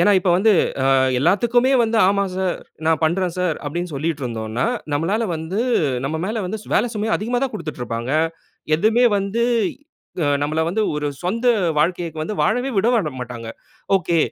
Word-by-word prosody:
ஏன்னா 180 - +5
இப்ப 185 0 0
வந்து, 210 +4 +4 0.4
அ - - +6 0.3
எல்லாத்துக்குமே 240 - +3
வந்து 225 0 0
"ஆமா 200 0 +1
சார். 185 -1 0 0.3
நான் 160 0 +2
பண்ணுறேன் 175 +2 +1
சார்." 180 -4 0
அப்படின்னு 175 +4 -3
சொல்லிட்டுருந்தோம்ன்னா, 125 -7 -2 0.3
நம்மளால 180 +10 0
வந்து 160 +6 -3 0.4
நம்ம 155 +4 -2
மேல 220 +2 -2
வந்து 205 +4 -3
சு - - -16
வேலை 230 - +3
சுமையை 215 +1 -2
அதிகமாத்தான் 245 +4 -1
குடுத்துட்டு 155 -10 -6
இருப்பாங்க. 115 +2 -4 0.7
எதுவுமே 225 +7 +3
வந்து 200 +4 -1 0.8
அ - - +2
நம்மள 155 +2 -1
வந்து 210 +6 0
ஒரு 150 0 -1 0.2
சொந்த 230 +7 -2 0.3
வாழ்க்கைக்கு 165 0 0
வந்து 160 +7 -3
வாழவே 245 +5 +1
விட 225 +2 +2
மாட்டாங்க. 120 -2 -7 0.5
ஓகே, 170 -2 +1
180 Hz, 155 wpm, -21 LUFS, 155-220 Hz, 0.8 s, அ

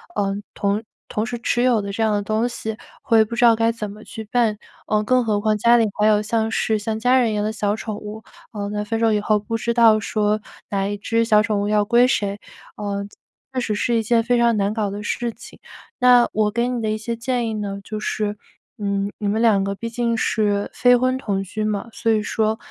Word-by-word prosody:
嗯， 200 0 -1
同 205 +2 -1 0.3
同 215 - -1
时 240 0 -5
持 240 +1 0
有 240 -4 +3
的 200 - -5
这 220 +3 -1
样 215 -1 +2
的 205 - 0
东 215 +3 0
西， 220 -2 -5 0.2
会 225 -3 +4
不 235 +2 -6
知 240 - +1
道 230 - +6
该 230 +1 +2
怎 215 -3 -5
么 210 +2 -11
去 220 - -8
办， 230 -4 +2 0.3
呃， 215 0 +1
更 255 +2 +2
何 210 -2 0
况 215 0 +1
家 235 +3 +5
里 230 -2 +4
还 210 - +3
有 210 -1 +4
像 220 +1 -1
是 220 -1 +1
像 215 +1 -3
家 250 +3 +4
人 235 -3 +2
一 - - -2
样 205 - 0
的 215 - -1
小 210 -2 -1
宠 215 -1 -5
物， 215 +1 -8 0.3
呃， 205 -1 -4
在 210 0 -2
分 225 +1 -2
手 225 -1 +3
以 210 - +2
后 210 0 +1
不 225 +2 -3
知 235 +1 -1
道 225 -2 +5
说， 210 0 0 0.3
哪 195 -1 -1
一 205 - -3
只 230 +3 0
小 215 -2 +5
宠 215 -2 0
物 205 - -1
要 210 0 +2
归 235 +3 +4
谁， 205 -4 -1 0.4
嗯， 200 -1 -4 0.4
确 255 - -1
实 220 -3 -1
是 235 +3 0
一 225 - 0
件 230 +1 +2
非 245 +1 +2
常 235 -1 +3
难 200 0 +1
搞 215 -2 -1
的 205 +1 -6
事 235 +2 -2
情。 - - -14 0.4
那 250 -1 +6
我 215 0 +2
给 235 +2 0
你 245 -2 -2
的 220 - -1
一 215 - -1
些 230 +2 -4
建 240 0 -1
议 220 - -3
呢 200 -2 -4
就 215 +1 -5
是， 210 -1 -2 0.4
嗯， 200 0 -1
你 210 - -2
们 210 +2 0
2 210 -4 +4
个 200 0 -2
毕 230 +3 -5
竟 235 0 -1
是 205 -2 0
非 245 0 +5
婚 255 +1 +1
同 200 -6 -2
居 215 +3 -4
嘛， 215 +1 -2
所 225 - -2
以 215 -1 +1
说 220 +1 0
215 Hz, 260 characters per minute, -21 LUFS, 205-230 Hz, 0.4 s, 道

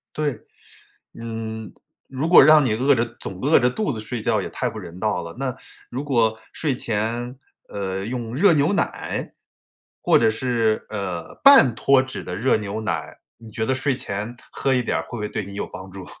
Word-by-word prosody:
对， 145 -6 -1 0.8
嗯， 110 -2 -6 0.3
如 135 +4 -3
果 175 - +9
让 155 0 +7
你 115 - +1
饿 135 +5 +3
着 115 0 +1
总 90 - -7
饿 150 +4 +5
着 125 -1 +3
肚 210 +9 -2
子 115 - -5
睡 110 +2 -5
觉 - - +1
也 - - -5
太 - - -2
不 - - -8
人 85 +2 -10
道 105 -4 0
了， 85 - -9
那 130 -1 -3 0.3
如 130 +3 -4
果 115 -5 +1
睡 150 -4 -1
前， 120 +3 -3 0.3
呃， 95 -1 -4
用 120 0 -4
热 175 +5 +5
牛 145 +2 +2
奶， 200 - -2 0.7
或 - - +4
者 - - +4
是， 115 -2 0
呃， 95 -5 -5
半 275 - +8
脱 135 +3 +4
脂 130 0 -6
的 90 - -5
热 120 +8 +2
牛 105 0 -4
奶， 110 - -4 0.2
你 115 -1 -13
觉 110 0 -2
得 130 - +1
睡 135 +2 +1
前 105 0 -4 0.2
喝 135 - 0
一 125 - +2
点 120 - -1
儿 - - -2
会 - - -17
不 - - -6
会 105 - -2
对 105 - -3
你 100 - -10
有 100 - -4
帮 95 +1 -10
助？ 95 -1 -9
115 Hz, 220 characters per minute, -22 LUFS, 105-130 Hz, 0.8 s, 果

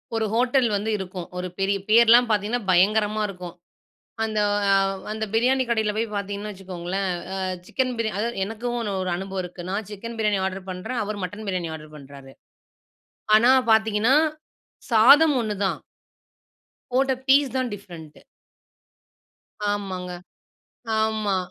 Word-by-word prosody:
1 225 - 0
hotel 245 +1 +3
வந்து 205 +2 -2
இருக்கும். 185 -2 -6
1 180 - -3
பெரிய 195 +1 +1
பேர்லாம் 235 +2 +6
பார்த்தீங்கன்னா, 215 +3 0
பயங்கரமா 210 +3 +3
இருக்கும். 180 -2 -8 0.7
அந்த 215 -1 -1 0.3
அவ் 195 0 +1
அந்த 220 0 -3
பிரியாணி 255 +3 +3
கடையில 220 -3 +1
போய் 225 - +1
பார்த்தீங்கன்னு 200 +1 -4
வச்சுக்கோங்களேன், 190 0 -4 0.2
அ - - -3 0.3
சிக்கன் 255 -1 -1
பிரியாணி, 220 -3 -2
அதா 225 - 0 0.2
எனக்கும் 240 +3 -4
1 205 -3 -3
1 180 - -2
அனுபவம் 190 +1 -4
இருக்கு. 180 0 -8
நான் 200 +1 -3
சிக்கன் 230 +3 -7
பிரியாணி 210 -3 +1
ஆர்ட்ரு 190 0 -4
பண்றேன், 220 +6 -4
அவரு 205 0 -5
மட்டன் 205 +4 -6
பிரியாணி 175 -3 -2
ஆர்ட்ரு 155 -1 -11
பண்ணுறாரு. 135 -1 -13 1.0
ஆனா, 235 +3 +5 0.2
பார்த்தீங்கன்னா, 220 +3 +3 0.8
சாதம் 280 +7 +7
1 210 -2 -3
தான். - - -2 1.2
போட்ட 265 +1 +3
ஃபீஸ் 275 0 +4
தான் 255 -1 0
டிவ்ரெண்டு 170 -6 -11 1.5
ஆமாங்க. 185 -3 -4 0.9
ஆமா. 215 -3 0
210 Hz, 135 wpm, -24 LUFS, 190-225 Hz, 1.5 s, சாதம்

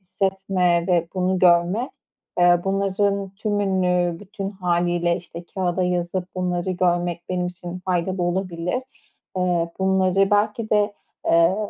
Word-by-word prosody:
hissetme 185 -2 0
ve 170 -2 +2
bunu 185 0 +1
görme, 180 +8 +3 0.5
eee, 175 0 +5
bunların 195 0 0
tümünü 185 -5 +1
bütün 200 -1 -6
hâliyle 175 -2 0
işte 170 -1 -9
kâğıda 185 -1 0
yazıp 180 0 -1
bunları 180 0 -1
görmek 175 -1 0
benim 180 -1 -1
için 180 0 -7
faydalı 180 0 -1
olabilir. 180 +5 -1 0.5
Eee, 175 -2 +1
bunları 190 +1 +2
belki 210 +2 +1
de, 205 0 +2 0.3
eee, 170 +3 +4
180 Hz, 120 wpm, -23 LUFS, 175-195 Hz, 0.5 s, eee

